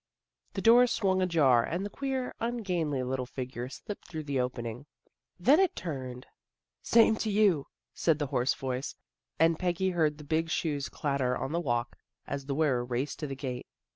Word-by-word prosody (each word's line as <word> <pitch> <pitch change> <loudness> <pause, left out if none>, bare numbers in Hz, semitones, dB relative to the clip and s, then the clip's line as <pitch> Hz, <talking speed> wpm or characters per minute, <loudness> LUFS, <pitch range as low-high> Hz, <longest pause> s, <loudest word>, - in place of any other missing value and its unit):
The - - -3
door 240 +2 +7
swung 190 -5 +1
ajar 150 -10 +4
and 175 +9 -2
the - - -3
queer, 265 0 -2
ungainly 180 - -1
little 130 0 -2
figure 125 -1 -5
slipped 205 +8 -8
through 160 -2 -5
the 140 -2 -1
opening. 125 +1 -3 0.5
Then 270 - +5
it 385 -3 +3
turned. 130 -6 -5 0.3
" - - -62
Same 225 -1 +5
to 220 - -1
you," 200 -8 +3 0.3
said 165 -3 +2
the 150 - -1
hoarse 125 +1 +2
voice, 130 0 -3 0.4
and 165 0 +3
Peggy 185 +1 0
heard 155 -4 +1
the 150 - -10
big 160 +3 0
shoes 150 -4 -1
clatter 140 -3 0
on 135 - -3
the 170 - 0
walk, 120 -5 -2 0.3
as 140 -1 -5
the 140 - -1
wearer 140 -5 +2
raced 125 +3 -3
to 150 - -3
the 135 - -5
gate. 130 -2 -5
150 Hz, 180 wpm, -30 LUFS, 130-185 Hz, 0.5 s, door